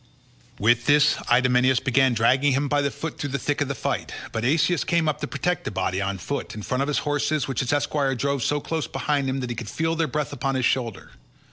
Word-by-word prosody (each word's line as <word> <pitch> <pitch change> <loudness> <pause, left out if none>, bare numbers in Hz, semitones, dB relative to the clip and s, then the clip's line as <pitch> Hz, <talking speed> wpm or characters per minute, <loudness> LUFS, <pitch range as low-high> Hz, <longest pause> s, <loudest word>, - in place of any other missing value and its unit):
With 120 +3 +2
this 150 0 +5
Idomeneus 125 +1 +4
began 130 -1 +2
dragging 130 +5 +3
him 140 +2 +1
by 145 +1 +1
the 140 - +1
foot 160 +2 -6
through 145 - -3
the 140 - -1
thick 145 +3 -2
of 145 - +1
the 140 - -3
fight, - - -3 0.2
but 115 - -3
Asius 155 +6 +2
came 170 -2 +1
up 155 - -1
to - - -2
protect 180 +6 -2
the - - -3
body, 95 -1 -1
on 100 0 -2
foot, 140 +8 -4
in 105 - -7
front 125 +5 -1
of 140 - 0
his 150 - 0
horses 145 0 0
which 135 - -2
his 125 - 0
esquire 145 -2 0
drove 140 +2 -1
so 145 +5 +1
close 160 +1 -3
behind 140 -2 -1
him 135 +1 -2
that 125 -1 -4
he - - -3
could 115 -2 -6
feel 160 +1 -1
their 165 -1 0
breath 150 0 -3
upon 135 +2 -2
his 130 -2 +1
shoulder. 115 -7 -1
135 Hz, 245 wpm, -24 LUFS, 125-145 Hz, 0.2 s, this